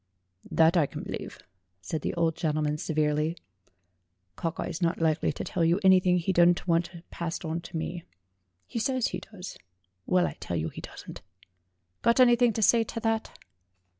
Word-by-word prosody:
"That 165 +2 +4
I 155 -4 +3
can - - -7
believe," - - -6 0.4
said 150 - -4
the - - -3
old 165 -1 +1
gentleman 150 -1 -1
se 160 - -4
verely; 155 +2 +1 1.0
"Cockeye 165 - -3
is 175 +1 -5
not 165 -1 +1
likely 160 -2 +1
to - - -5
tell 175 - -1
you 170 +3 +3
anything 185 -1 +5
he 180 +2 0
doesn't 175 +1 +4
want 170 0 -1
passed 170 +1 -4
on 165 +1 -2
to 170 0 -7
me. 170 +1 -4 0.6
He 230 - -4
says 260 +1 0
he - - -4
does; 195 -3 -10 0.5
well, 180 -1 +3
I - - -4
tell 85 - -3
you 80 0 -2
he - - -9
doesn't. - - -10 0.8
Got 235 +2 +3
anything 240 -1 +6
to 220 - 0
say 230 +2 +5
to 230 - -6
that?" 225 0 -1
170 Hz, 175 wpm, -28 LUFS, 160-190 Hz, 1.0 s, anything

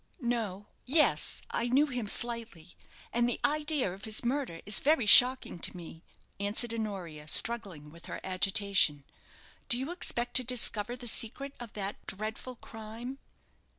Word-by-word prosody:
"No 220 -5 -2 0.2
yes, 300 +4 +2
I 235 - -1
knew 270 +5 +3
him 250 -6 -4
slightly; 230 -8 -3 0.4
and 240 0 +2
the 245 - -2
idea 295 - 0
of 195 +1 -10
his 220 +2 -3
murder 250 -9 -2
is 205 -1 +1
very 290 -5 +2
shocking 250 -2 +7
to 180 - -3
me," 165 -1 -11 0.4
answered 210 +4 +1
Honoria, 185 -9 -5
struggling 185 -8 +1
with 170 +1 -14
her - - -6
agitation. 190 -5 +2 0.7
"Do 240 - +4
you 265 +6 -4
expect 245 -9 -2
to 255 - +2
discover 240 -2 -1
the 250 -1 -9
secret 245 +4 -1
of 240 -3 -9
that 200 -1 -6
dreadful 220 +5 -5
crime?" 225 +4 -9
230 Hz, 150 wpm, -30 LUFS, 195-250 Hz, 0.7 s, shocking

